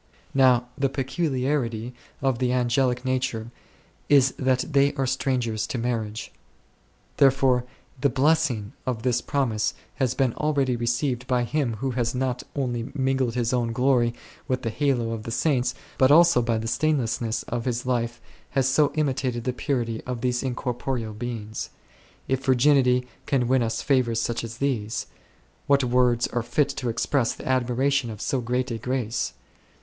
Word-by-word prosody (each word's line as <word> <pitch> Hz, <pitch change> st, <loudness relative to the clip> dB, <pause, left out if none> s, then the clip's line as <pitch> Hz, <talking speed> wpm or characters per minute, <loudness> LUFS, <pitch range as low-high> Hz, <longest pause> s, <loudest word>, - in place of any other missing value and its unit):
Now 130 Hz, -2 st, +4 dB
the 135 Hz, -1 st, +1 dB
peculiarity 130 Hz, -4 st, -1 dB, 0.3 s
of 135 Hz, -3 st, +1 dB
the 125 Hz, -1 st, +1 dB
angelic 125 Hz, 0 st, +1 dB
nature 125 Hz, -3 st, -1 dB, 0.6 s
is 135 Hz, -2 st, +6 dB
that 130 Hz, -1 st, +1 dB
they 140 Hz, -2 st, +3 dB
are 135 Hz, -, 0 dB
strangers 125 Hz, -4 st, -1 dB
to -, -, -3 dB
marriage; 115 Hz, -2 st, -3 dB, 0.9 s
therefore 135 Hz, -2 st, +4 dB, 0.3 s
the 140 Hz, -, +3 dB
blessing 130 Hz, -5 st, +1 dB
of 115 Hz, -3 st, -2 dB
this 125 Hz, -1 st, +1 dB
promise 120 Hz, -8 st, 0 dB, 0.2 s
has 130 Hz, -3 st, 0 dB
been 130 Hz, -4 st, +1 dB
already 140 Hz, -4 st, +1 dB
received 120 Hz, +2 st, -1 dB
by 125 Hz, -1 st, +2 dB
him 125 Hz, -2 st, -1 dB
who 130 Hz, +5 st, -2 dB
has 120 Hz, -1 st, -1 dB
not 125 Hz, -1 st, -1 dB
only 120 Hz, -4 st, -2 dB
mingled 130 Hz, -3 st, 0 dB
his 120 Hz, 0 st, 0 dB
own 120 Hz, -2 st, 0 dB
glory 125 Hz, -1 st, +2 dB, 0.3 s
with 130 Hz, 0 st, -1 dB
the 115 Hz, -, -1 dB
halo 125 Hz, -3 st, 0 dB
of 115 Hz, -1 st, -4 dB
the 115 Hz, -, -7 dB
Saints, 125 Hz, 0 st, +1 dB, 0.2 s
but 130 Hz, -, +6 dB
also 165 Hz, -3 st, +6 dB
by 115 Hz, -1 st, 0 dB
the 110 Hz, +1 st, -3 dB
stainlessness 120 Hz, -5 st, 0 dB
of 120 Hz, -1 st, -4 dB
his 125 Hz, -1 st, -2 dB
life 120 Hz, -2 st, -1 dB, 0.4 s
has 135 Hz, -1 st, +3 dB
so 145 Hz, +2 st, +3 dB
imitated 130 Hz, -5 st, -1 dB
the 125 Hz, -, -1 dB
purity 120 Hz, -4 st, -2 dB
of 125 Hz, -2 st, -3 dB
these 125 Hz, -1 st, 0 dB
incorporeal 125 Hz, -2 st, -3 dB
beings. 110 Hz, -1 st, -5 dB, 0.6 s
If 130 Hz, 0 st, -1 dB
virginity 130 Hz, -1 st, +4 dB
then 125 Hz, -, -22 dB, 0.2 s
can 130 Hz, -4 st, +1 dB
win 130 Hz, 0 st, +3 dB
us 115 Hz, -1 st, -1 dB
favours 125 Hz, -5 st, +2 dB
such 120 Hz, 0 st, -2 dB
as 115 Hz, 0 st, -7 dB
these, 115 Hz, -6 st, -1 dB, 0.6 s
what 140 Hz, -1 st, +4 dB
words 125 Hz, -1 st, +3 dB
are 120 Hz, -, -1 dB
fit 135 Hz, +5 st, +1 dB
to 135 Hz, -3 st, -3 dB
express 120 Hz, +2 st, 0 dB
the -, -, -9 dB
admiration 130 Hz, +1 st, +1 dB
of 110 Hz, -2 st, -7 dB
so 130 Hz, +2 st, -1 dB
great 125 Hz, +2 st, -1 dB
a 115 Hz, -, -3 dB
grace? 125 Hz, -, -2 dB
125 Hz, 160 wpm, -25 LUFS, 120-135 Hz, 0.9 s, is